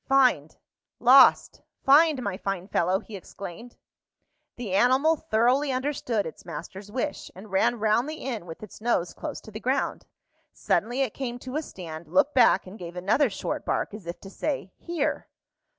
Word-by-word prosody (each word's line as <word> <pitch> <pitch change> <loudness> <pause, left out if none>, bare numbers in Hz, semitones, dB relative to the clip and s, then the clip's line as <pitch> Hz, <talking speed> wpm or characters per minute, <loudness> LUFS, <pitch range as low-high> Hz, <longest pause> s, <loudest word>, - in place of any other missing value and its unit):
"Find 255 - +3 0.4
lost 255 +3 +6 0.2
find, 290 -1 +5
my 200 -4 -2
fine 190 -1 -4
fellow!" 185 0 +1
he 220 - -10
exclaimed. 200 +4 -9 0.8
The 225 -6 -5
animal 260 +10 +4
thoroughly 265 0 +1
understood 255 -5 -1
its 160 - -9
master's 195 +4 -8
wish, 265 +5 -3
and 200 +2 -12
ran 235 +5 +2
round 220 +5 +1
the 310 - -4
inn 235 - -5
with 165 +5 -9
its 210 - -11
nose 215 -7 0
close - - -6
to 220 - -13
the 215 - -7
ground. 260 +4 -1 0.4
Suddenly 245 +4 0
it 260 -6 0
came 245 -3 -4
to 255 +2 -8
a 305 - 0
stand, 170 - -9
looked 185 - +2
back, 245 -6 +5
and 190 +4 -11
gave 175 -1 -8
another 215 +10 +2
short 195 - -4
bark, - - -1
as 210 -5 -9
if 170 - -6
to 195 - -10
say, 235 -10 -3
"Here!" 310 -3 -2
230 Hz, 170 wpm, -26 LUFS, 190-270 Hz, 0.8 s, lost